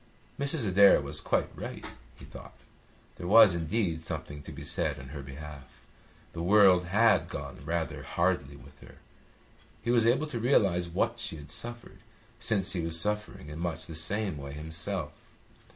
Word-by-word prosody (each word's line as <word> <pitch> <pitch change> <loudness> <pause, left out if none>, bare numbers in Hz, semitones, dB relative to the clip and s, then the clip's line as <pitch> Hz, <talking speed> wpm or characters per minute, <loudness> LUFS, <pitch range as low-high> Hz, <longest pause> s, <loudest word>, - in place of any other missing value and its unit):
Mrs. 140 -4 +1
Adair 100 +1 +6
was 70 +1 -2
quite - - -1
right, - - -7 0.3
he - - -13
thought. - - -12 0.6
There 85 - -6
was 105 -1 +8
indeed 85 -1 -1
something 75 -2 -6
to - - -10
be - - -9
said - - -1
on 65 -1 -10
her 75 0 -7
behalf. 70 0 -11 0.5
The 85 - -5
world 95 -1 +5
had 105 +4 +3
gone - - -7
rather 85 -1 -3
hardly 85 -6 -1
with 70 +2 -16
her. - - -15 0.9
He 120 - 0
was 115 -2 +4
able 130 +6 +3
to 150 -6 -5
realise 100 -8 +2
what 115 +7 -1
she 115 -7 -2
had 75 -1 -10
suffered, 120 0 -7 0.4
since 100 -3 0
he 90 - -1
was 80 0 -1
suffering 105 -6 -3
in 75 +1 -7
much 85 -1 -3
the 80 - -8
same 95 +2 -1
way 70 0 -7
himself. 80 +2 -3
85 Hz, 170 wpm, -29 LUFS, 75-105 Hz, 0.9 s, was